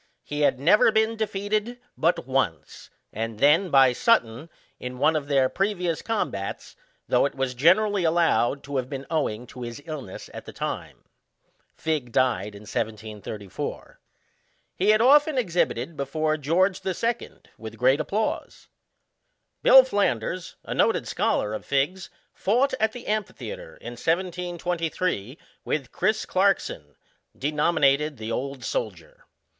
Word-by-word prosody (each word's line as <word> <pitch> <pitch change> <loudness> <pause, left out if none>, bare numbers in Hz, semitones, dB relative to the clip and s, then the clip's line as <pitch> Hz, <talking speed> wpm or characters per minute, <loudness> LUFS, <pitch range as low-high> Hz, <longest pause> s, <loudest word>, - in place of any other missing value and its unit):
He 145 - -5
had 135 -3 +3
never 195 +10 +5
been 220 +1 +2
defeated 215 +2 -2 0.2
but 165 -4 +1
once, 125 - -2 0.2
and 115 0 -4
then 150 - +4
by 135 -4 +6
Sutton, 130 - +1 0.3
in 125 0 -6
one 150 +4 +3
of 145 -2 -2
their 135 -2 +3
previous 180 -2 -1
combats, 150 - -3 0.3
though - - +3
it - - -11
was 135 -1 -1
generally 190 - +3
allowed 160 -5 +2
to 140 -1 -4
have 130 -1 -2
been 135 -1 -5
owing 125 -8 -1
to 125 +1 -11
his 120 +1 -6
illnes 145 - -7
at - - -8
the - - -10
time. - - -5 0.7
Figg 150 -7 -2
died 105 -5 +1
in 100 - -11
1734. 105 -2 -5 0.8
He 195 +3 +1
had 215 +1 +5
often 290 +3 +5
ex 210 -9 -1
hibited 160 -3 0
before. 155 +2 -1
George 180 +6 +1
the 190 -2 -2
Second, 235 +3 -4
with - - -8
great - - +3
applause. - - -3 0.9
Bill 265 0 +9
Flanders, 185 - -1
a - - -5
noted - - +2
scholar 105 - 0
of 110 - -5
Figg's 150 +7 -1 0.2
fought, 245 +8 +1
at 220 0 +2
the 245 - -9
amphitheatre, 135 - -4
in 120 - -8
1723, 170 - -2 0.3
with 135 -5 -3
Chris. 215 0 0
Clarkson, 185 - 0 0.4
denominated 150 0 +2
the 110 +1 -5
Old 135 +3 -4
Soldier. - - -5
155 Hz, 140 wpm, -25 LUFS, 125-195 Hz, 0.9 s, Bill